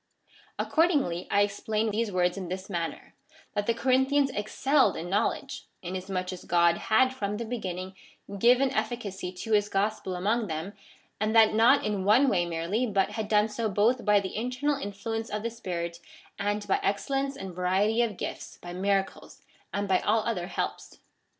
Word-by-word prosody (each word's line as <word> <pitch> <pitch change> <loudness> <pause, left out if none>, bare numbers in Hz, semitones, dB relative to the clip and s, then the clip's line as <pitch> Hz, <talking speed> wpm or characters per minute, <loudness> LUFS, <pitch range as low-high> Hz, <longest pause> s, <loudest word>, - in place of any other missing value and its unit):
Accordingly, 290 - +1
1 200 - +3
explain 215 +2 0
these 220 0 -1
words 180 -1 +1
in 190 -2 -5
this 185 +3 -6
manner 170 -2 -4 0.2
— 320 - -26
that 205 -1 -2
the 230 - +3
Corinthians 265 +3 +2
excelled 265 +6 +2
in 175 +2 -5
knowledge, 230 +6 -1 0.2
inasmuch 185 0 -3
as 180 - -9
God 170 -1 +3
had 255 +4 +4
from 210 -5 -3
the 235 - -4
be 240 +1 -4
ginning 185 0 -5 0.5
given 250 +4 +4
efficacy 215 -5 -3
to 185 +5 -7
his 210 -1 +3
gospel 195 -2 -1
among 215 +5 0
them, 165 +4 -4 0.5
and 215 +2 0
that 220 -1 +6
not 235 +6 +5
in 205 -3 -1
one 235 +8 +5
way 175 -5 +1
merely, 170 +9 -1
but 195 -1 +1
had 215 0 -3
done 210 0 +3
so 220 +1 -2
both 225 +5 +2
by 210 -1 +4
the 190 -1 -5
internal 250 +6 -1
influence 225 +3 -4
of 210 0 -3
the 230 - -2
Spirit, 170 -6 -5 0.4
and 205 +1 -1
by 195 - +2
excellence 275 +7 -1
and 190 -2 -7
variety 190 +6 +1
of 220 -5 -1
gifts, - - -6
by 175 0 -8
miracles, 195 +1 -2 0.3
and 200 0 -2
by 190 -1 +3
all 220 +1 +2
other 180 -7 -2
helps. - - -4
205 Hz, 175 wpm, -28 LUFS, 185-230 Hz, 0.5 s, that